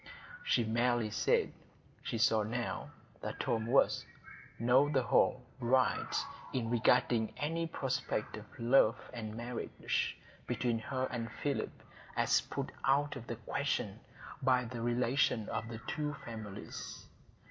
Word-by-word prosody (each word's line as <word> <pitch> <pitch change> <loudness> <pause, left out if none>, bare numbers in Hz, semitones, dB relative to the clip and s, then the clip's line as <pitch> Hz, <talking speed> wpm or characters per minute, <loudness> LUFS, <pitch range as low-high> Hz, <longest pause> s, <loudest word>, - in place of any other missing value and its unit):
She 120 - +3
merely 120 0 +1
said, - - +2 0.5
she - - -3
saw 110 -1 +4
now 120 +3 -3 0.3
that - - -5
Tom 110 -1 0
was, 130 +4 +4 0.6
on 130 +6 +4
the 130 -2 +3
whole, 125 +1 +3 0.2
right 130 +1 +2 0.4
in 120 -3 -1
regarding 120 -1 +3
any 165 +3 -1
prospect 130 -7 -2
of 110 -1 -8
love 120 -1 +5 0.2
and 110 -3 -5
marriage 120 0 -2 0.3
between 120 -2 0
her 130 +3 -2
and 115 -2 -3
Philip 145 -1 -3 0.3
as - - +4
put - - -4
out 145 +2 +3
of 120 -3 -8
the 120 - -3
question 110 -2 -2 0.4
by 130 -2 +3
the 115 0 -5
relation 120 -1 +2
of 110 - -2
the 115 -1 -6
two 150 -1 -2
families. 110 -4 -7
120 Hz, 130 wpm, -34 LUFS, 115-130 Hz, 0.6 s, love